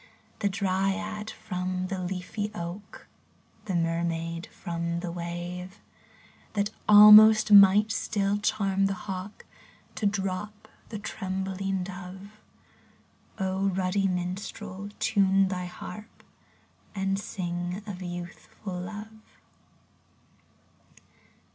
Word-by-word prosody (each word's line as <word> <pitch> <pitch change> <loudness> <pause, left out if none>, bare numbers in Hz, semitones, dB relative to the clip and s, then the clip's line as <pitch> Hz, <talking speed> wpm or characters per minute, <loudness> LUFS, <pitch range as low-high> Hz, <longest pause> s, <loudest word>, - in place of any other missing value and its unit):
The 205 - +1
dryad 200 +3 -1
from 185 -3 -4
the 190 -2 -3
leafy 190 +3 -3
oak, 175 +3 -7 0.6
The 190 -4 -2
mermaid 165 0 -1
from 170 0 -4
the 175 -2 -4
wave; 175 +2 -6 0.7
That 205 0 0 0.2
almost 210 +1 +9
might 205 +2 +8
still 205 0 0
charm 195 -2 +1
the 195 - -2
hawk 190 +1 -6 0.5
To 210 - 0
drop 200 +1 -3 0.2
the 220 - -5
trembling 190 -1 -3
dove? 190 +3 -9 1.0
ruddy 190 0 0
minstrel, 185 +2 -4
time 195 -3 +3
thy 180 -1 -3
harp. 195 +4 -10 0.7
And 195 0 0
sing 175 0 -4
of 195 -3 -7
Youthful 175 +2 -7
Love 215 +4 -9
190 Hz, 90 wpm, -27 LUFS, 180-205 Hz, 1.0 s, almost